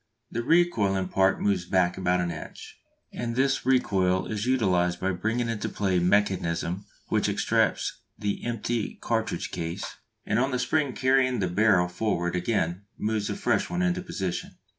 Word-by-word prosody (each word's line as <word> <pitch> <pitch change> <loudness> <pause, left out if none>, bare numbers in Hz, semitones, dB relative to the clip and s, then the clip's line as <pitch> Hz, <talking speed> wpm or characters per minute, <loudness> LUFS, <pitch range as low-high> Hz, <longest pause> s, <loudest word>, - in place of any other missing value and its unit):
The 115 - -2
recoiling 110 - +2
part 95 0 +3
moves 95 -4 +1
back 90 -1 +2
about 90 -1 +1
an 85 -1 -1
inch, 80 - -9 0.3
and 115 -1 -3
this 130 0 +1
recoil 95 -8 +2
is 110 +2 -3
utilised 90 -9 +2
by 95 +1 0
bringing 110 +6 -1
into 115 -3 -2
play 95 -3 0
mechanism 90 -1 +1 0.2
which - - +2
extracts - - +1 0.2
the 105 -1 -2
empty 120 -1 -2
cartridge - - -2
case, 85 -1 -5 0.3
and - - +1
on 130 +2 +2
the 130 - -1
spring 135 +2 0
carrying 130 -1 +2
the 95 - 0
barrel 90 -1 +3
forward 90 -2 -1
again 90 -1 0 0.2
moves 105 -1 -1
a - - -2
fresh 200 - 0
one 175 +1 -1
into 180 0 +1
position. 95 - -4
100 Hz, 160 wpm, -27 LUFS, 90-120 Hz, 0.3 s, part